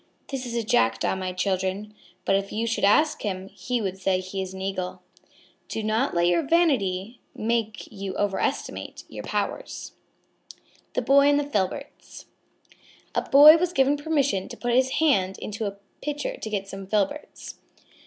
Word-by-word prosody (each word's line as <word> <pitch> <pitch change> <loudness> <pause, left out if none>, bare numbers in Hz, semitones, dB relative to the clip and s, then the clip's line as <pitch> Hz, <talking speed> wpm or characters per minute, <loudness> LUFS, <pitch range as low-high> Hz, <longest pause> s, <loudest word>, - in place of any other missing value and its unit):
"That 270 -2 -3
is 235 - -5
a 235 - 0
Jackdaw, 115 - +2
my 185 -1 -3
children. 190 +2 -2 0.3
But 195 - +3
if 195 0 -1
you 225 +2 -1
should 230 0 -1
ask 300 +10 +4
him, 190 -2 -4
he 250 +3 -3
would 190 -1 -3
say 190 0 +1
he 185 +1 -4
is 190 -1 -5
an 190 - -8
Eagle." 190 -1 -4 0.6
Do 220 - -4
not 220 +4 0
let 170 0 +3
your 175 -1 +3
vanity 245 - +1 0.2
make 220 -1 -1
you 195 -2 -5
overestimate 205 -1 -2
your - - -8
powers. - - -3 1.0
THE - - +1
BOY 280 +1 +5
AND 290 0 +4
THE - - 0
FILBERTS 280 +2 -4 0.9
A - - +1
Boy 300 +3 +9
was 355 +1 -1
given 275 0 +3
permission 285 -9 0
to - - -8
put 240 -1 -1
his 260 +1 +3
hand 195 -12 +2
into 215 0 -4
a 200 0 -6 0.2
pitcher 295 -1 -3
to 220 - -6
get 200 -2 -2
some 195 0 -8
filberts. 210 +8 -2
210 Hz, 165 wpm, -25 LUFS, 190-275 Hz, 1.0 s, Boy